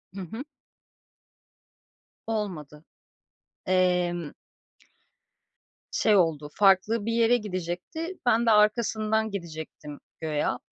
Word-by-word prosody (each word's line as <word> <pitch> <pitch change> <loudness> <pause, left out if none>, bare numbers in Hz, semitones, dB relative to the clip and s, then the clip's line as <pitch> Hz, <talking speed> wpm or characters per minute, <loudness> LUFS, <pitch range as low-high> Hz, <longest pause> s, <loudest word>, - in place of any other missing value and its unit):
Hı 195 - -5
hı. 220 +9 -6 1.8
Olmadı. 170 -9 -4 0.8
Emm 180 -3 +1 1.6
şey 215 -2 +3
oldu, 155 -5 +2
farklı 205 +2 +3
bir 230 - -1
yere 235 +1 +4
gidecekti, 200 - -5
ben 235 -1 +3
de 225 - +4
arkasından 220 0 +2
gidecektim 160 -5 -7 0.2
güya 155 -2 -1
195 Hz, 85 wpm, -27 LUFS, 170-220 Hz, 1.8 s, yere